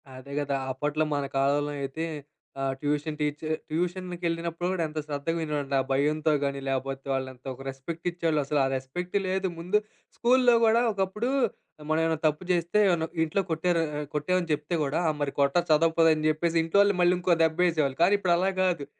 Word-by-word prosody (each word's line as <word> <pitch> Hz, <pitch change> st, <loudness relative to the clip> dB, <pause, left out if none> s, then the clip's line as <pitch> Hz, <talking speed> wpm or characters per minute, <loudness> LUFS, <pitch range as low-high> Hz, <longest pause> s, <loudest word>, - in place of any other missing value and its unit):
అదే 135 Hz, +2 st, -10 dB
గదా! 140 Hz, -1 st, -1 dB, 0.2 s
అప్పట్లో 150 Hz, +4 st, -1 dB
మన 140 Hz, -1 st, -1 dB
కాలంలో 145 Hz, +2 st, +1 dB
అయితే 135 Hz, +4 st, -4 dB, 0.6 s
ఆహ్, 135 Hz, 0 st, 0 dB
ట్యూషన్ 150 Hz, +1 st, -2 dB
టీచర్ 150 Hz, +1 st, -2 dB, 0.2 s
ట్యూషన్‌కెళ్ళినప్పుడు 175 Hz, 0 st, -2 dB
కూడా 185 Hz, -3 st, -1 dB
ఎంత 155 Hz, 0 st, -5 dB
శ్రద్ధగా 150 Hz, +3 st, -2 dB
వినేవాడినో. 145 Hz, -3 st, -2 dB
ఆ -, -, -5 dB
భయంతో 150 Hz, +3 st, +2 dB
గాని 140 Hz, 0 st, -1 dB
లేకపోతే 135 Hz, 0 st, -3 dB
వాళ్ళు 135 Hz, -1 st, -1 dB
ఎంత 125 Hz, +1 st, -24 dB
ఒక 130 Hz, -, -12 dB
రెస్పెక్ట్ 155 Hz, +6 st, -6 dB
ఇచ్చేవాళ్ళు 165 Hz, -3 st, 0 dB
అసలు 145 Hz, +1 st, 0 dB
ఆ -, -, +3 dB
రెస్పెక్ట్ 135 Hz, +9 st, -5 dB
లేదు. 190 Hz, +1 st, 0 dB
ముందు 180 Hz, +5 st, +1 dB, 0.4 s
స్కూల్‌లో 245 Hz, 0 st, +4 dB
గూడా 225 Hz, +1 st, +4 dB
ఒకప్పుడు 200 Hz, +4 st, -1 dB, 0.6 s
మనం 155 Hz, +1 st, +2 dB
ఏమైనా 160 Hz, -1 st, +1 dB
తప్పు 155 Hz, +3 st, -1 dB
జేస్తే 175 Hz, +3 st, +1 dB
ఏమన్నా 170 Hz, -3 st, +1 dB, 0.2 s
ఇంట్లో 160 Hz, +5 st, 0 dB
కొట్టారు 165 Hz, +1 st, +1 dB, 0.2 s
ఆహ్, 150 Hz, -, -4 dB
కొట్టామని 170 Hz, +3 st, 0 dB
చెప్తే 150 Hz, +3 st, -2 dB
గూడా 145 Hz, +4 st, 0 dB, 0.2 s
మరి 140 Hz, -1 st, -1 dB
కొట్ట 140 Hz, -1 st, +2 dB
చదవకపోతే 165 Hz, +1 st, +4 dB
అని 155 Hz, 0 st, -3 dB
జెప్పేసి 165 Hz, +2 st, 0 dB
ఇంట్లో 165 Hz, +5 st, +2 dB
వాళ్ళు 200 Hz, -2 st, +3 dB
మళ్ళీ 175 Hz, +1 st, +4 dB
ఇంకో 180 Hz, -1 st, +3 dB
దెబ్బ 160 Hz, +3 st, +1 dB
ఏసేవాళ్ళు. 145 Hz, -5 st, 0 dB
కానీ 195 Hz, +4 st, +5 dB
ఇప్పుడు 185 Hz, -3 st, +2 dB
అలా 190 Hz, +2 st, +1 dB
కాదు 170 Hz, -6 st, 0 dB
160 Hz, 180 wpm, -27 LUFS, 145-175 Hz, 0.6 s, కానీ